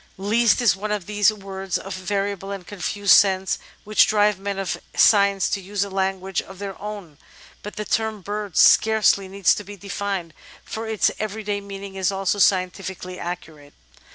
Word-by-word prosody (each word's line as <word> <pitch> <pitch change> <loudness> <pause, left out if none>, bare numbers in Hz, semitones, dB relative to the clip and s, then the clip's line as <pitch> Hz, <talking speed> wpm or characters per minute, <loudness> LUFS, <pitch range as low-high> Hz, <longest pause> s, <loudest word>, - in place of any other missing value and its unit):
'^east" 220 +5 +2
is 235 - +4
one 210 +2 -4
of 205 -4 -2
those 205 +1 +3
words 195 -2 -4
of 195 - -7
variable 195 +1 -3
and 195 -2 -6
confused 200 +1 +1
sense 190 -1 +3 0.2
which 215 0 +4
drive 210 -2 +2
men 200 0 -4
of 195 -1 -2 0.2
science 200 -3 +4
to 200 - -2
use 200 +1 -2
a 200 - -7
language 190 0 -1
of 190 - -13
their 195 -1 -6
own, 200 -8 -8 0.4
but 210 - -8
the 210 - -4
term 220 0 -1
"bird" 205 -1 -5
scarcely 215 -3 +5
needs 195 0 +2
to 210 - -5
be 205 +1 -10
defined, 195 -3 -4 0.3
for 225 +1 -5
its 220 -2 +2
everyday 210 -1 -3
meaning 200 0 -8
is 190 0 0
also 195 +1 -1
scientifically 185 -1 0
accurate. 155 -4 -8
200 Hz, 170 wpm, -23 LUFS, 190-210 Hz, 0.4 s, scarcely